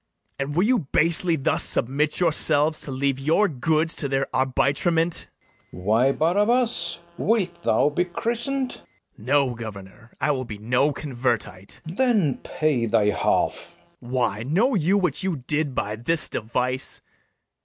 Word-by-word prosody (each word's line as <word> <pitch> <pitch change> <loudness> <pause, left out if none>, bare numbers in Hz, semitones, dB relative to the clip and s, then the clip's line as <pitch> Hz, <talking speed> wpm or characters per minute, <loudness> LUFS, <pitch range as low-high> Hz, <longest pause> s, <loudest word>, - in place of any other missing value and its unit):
And 140 +2 -3
will 175 - +3
you 250 +1 +3
basely 170 +1 +3
thus 140 - 0
submit 145 +5 0
yourselves 155 -2 +2
To 140 - -5
leave 135 0 -1
your 160 +9 +3
goods 160 +2 0
to 145 - -2
their 135 0 +1
arbitrement? 160 +6 +1 0.4
FERNEZE. 90 +3 -11
Why, 115 +6 +3
Barabas, 210 - +1 0.2
wilt 185 -6 0
thou 140 0 +2
be 175 +4 0
christened? 240 +8 -2
BARABAS. - - -14 0.3
No, 135 +3 +1
governor, 110 0 -10
I 145 +2 +1
will 130 -2 -2
be 105 -3 -7
no 125 +7 +1
convertite. 120 -8 -3
FERNEZE. 165 +3 -8
Then 215 - +2
pay 145 -7 -1
thy 105 -2 +3
half. - - -1 0.2
BARABAS. 120 +1 -9
Why, 115 -4 0
know 190 - +1
you 190 0 +2
what 185 -2 0
you 175 -9 -3
did 145 -2 -1
by 105 +1 -2
this 160 +8 +1
device? 125 +4 -1
145 Hz, 150 wpm, -24 LUFS, 125-175 Hz, 0.4 s, will